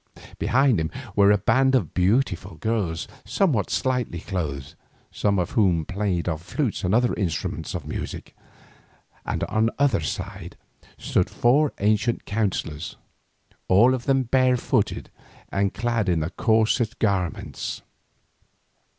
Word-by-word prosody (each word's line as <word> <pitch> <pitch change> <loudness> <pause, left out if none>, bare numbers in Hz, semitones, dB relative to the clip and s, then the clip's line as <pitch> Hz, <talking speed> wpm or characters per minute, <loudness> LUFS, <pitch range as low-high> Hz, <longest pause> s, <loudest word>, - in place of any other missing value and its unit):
Behind 130 -4 +3
him 80 0 -1 0.3
were 100 0 +6
a 105 - +5
band 130 +7 +3
of 130 - 0
beautiful 95 -2 +1
girls 95 -2 -2 0.2
somewhat 120 - +1
slightly 125 -9 -1
clothed, 75 -8 -4 0.4
some 100 -1 0
of 90 -1 -1
whom 90 -7 +2
played 95 -3 -2
on 80 -3 -1 0.2
lutes 135 -9 0
and 95 +3 +2
other 120 +1 +3
instruments 90 -7 -3
of - - -5
music, - - -6 0.9
and - - -1
on 110 +1 +1
either 140 -1 +3
side 100 -4 -5 0.4
stood - - 0
four 140 +5 +3
ancient 110 +3 +1
counsellors, 95 -7 -2 0.7
all 115 +8 +5
of 125 -2 -3
them 135 -1 +2
barefooted 130 0 +1 0.4
and 100 0 0
clad 115 -3 0
in 85 -3 +1
the 80 +3 -3
coarsest 110 +2 +1
garments. 95 -7 -2
105 Hz, 125 wpm, -24 LUFS, 90-120 Hz, 0.9 s, were